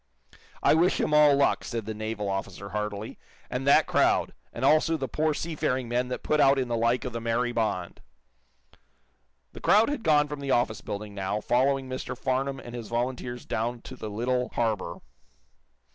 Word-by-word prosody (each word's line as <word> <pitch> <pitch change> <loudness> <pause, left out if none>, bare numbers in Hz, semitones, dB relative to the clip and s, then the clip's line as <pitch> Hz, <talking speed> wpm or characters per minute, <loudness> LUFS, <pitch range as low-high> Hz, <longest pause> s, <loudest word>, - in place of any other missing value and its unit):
"I - - +5
wish 170 +4 +3
him 150 - 0
all 150 -1 +6
luck," 140 0 +2
said 115 -3 -4
the 110 - -4
naval 110 -1 -4
officer, 95 0 -4
heartily. 105 +1 -4 0.3
"And 130 +2 -3
that 140 - +6
crowd, - - +2 0.2
and 120 - -3
also 155 +3 +4
the 135 - -3
poor 155 +4 0
seafaring 130 -7 -2
men 120 +1 0
that 125 - -5
put 150 - +1
out 135 -1 +5
in 130 -2 -1
the 120 - 0
like 115 +3 +1
of 125 - -4
the 115 - -4
'Mary 115 +2 0
Bond.'" 110 -7 -2 1.5
The - - -10
crowd 215 +5 +5
had 290 -4 -2
gone 150 -5 +4
from 150 0 -6
the 140 -1 -5
office 120 -4 +1
building, 105 0 -6
now, 100 +1 -2
following 130 +4 +1
Mr. 130 0 -5
Farnum 135 +1 -1
and 120 -1 -10
his 120 -3 -6
volunteers 120 0 -3
down 120 +2 -2
to - - -9
the 110 - -6
little 125 +4 -1
harbor. 110 -7 -1
125 Hz, 185 wpm, -27 LUFS, 110-140 Hz, 1.5 s, all